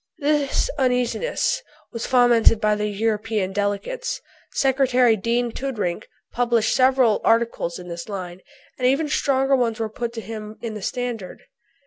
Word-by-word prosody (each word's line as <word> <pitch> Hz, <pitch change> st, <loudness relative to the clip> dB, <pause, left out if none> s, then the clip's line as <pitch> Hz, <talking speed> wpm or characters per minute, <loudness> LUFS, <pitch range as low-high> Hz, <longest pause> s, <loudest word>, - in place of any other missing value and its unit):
This 290 Hz, -2 st, +1 dB
uneasiness 255 Hz, -, 0 dB, 0.3 s
was 230 Hz, -1 st, -4 dB
fomented 240 Hz, -3 st, +5 dB
by 215 Hz, -1 st, +2 dB
the 210 Hz, 0 st, -1 dB
European 210 Hz, -1 st, -1 dB
delegates. 205 Hz, -, -2 dB, 0.3 s
Secretary 255 Hz, -3 st, +3 dB
Dean 235 Hz, +3 st, 0 dB
Toodrink 225 Hz, -10 st, -3 dB, 0.2 s
published 235 Hz, -2 st, +1 dB
several 255 Hz, -4 st, +3 dB
articles 225 Hz, -7 st, +1 dB
in 180 Hz, -, -10 dB
this 170 Hz, +2 st, -7 dB
line, 185 Hz, -2 st, -6 dB, 0.4 s
and 250 Hz, -, +2 dB
even 280 Hz, +4 st, +2 dB
stronger 270 Hz, -1 st, +2 dB
ones 235 Hz, -3 st, 0 dB
were 220 Hz, -1 st, -2 dB
put 235 Hz, +2 st, -5 dB
by 225 Hz, -, -4 dB
him 215 Hz, -1 st, -8 dB
in 230 Hz, -2 st, -5 dB
the 210 Hz, -, -7 dB
Standard. 235 Hz, -3 st, -4 dB
230 Hz, 140 wpm, -23 LUFS, 210-255 Hz, 0.4 s, fomented